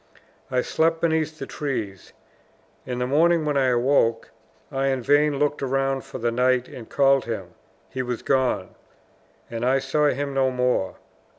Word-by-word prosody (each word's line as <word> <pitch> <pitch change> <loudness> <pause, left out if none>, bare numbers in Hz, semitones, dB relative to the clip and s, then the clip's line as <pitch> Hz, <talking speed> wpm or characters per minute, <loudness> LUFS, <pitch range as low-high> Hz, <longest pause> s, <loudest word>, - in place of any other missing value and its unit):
I 125 -1 +1
slept 165 +4 +1
beneath 160 -2 0
the - - -5
trees. 115 - -5 0.8
In 125 -1 -3
the 125 - -1
morning, 160 +4 +3
when 150 -1 0
I 135 -1 +3
awoke, 120 -2 +2 0.4
I 135 0 0
in 135 -2 0
vain 145 +2 +3
looked 145 +1 0
round 135 -1 0
for - - -7
the 120 0 -1
knight 125 +1 +2
and 115 -3 -10
called 135 -1 +3
him; 100 -6 -5 0.3
he 130 - -4
was 125 -2 -4
gone; 130 -2 +1 0.8
and 115 0 -4
I 130 +2 +3
saw 135 +3 +1
him 140 0 -1
no 135 -1 +2
more. 125 -6 0
135 Hz, 165 wpm, -24 LUFS, 125-145 Hz, 0.8 s, morning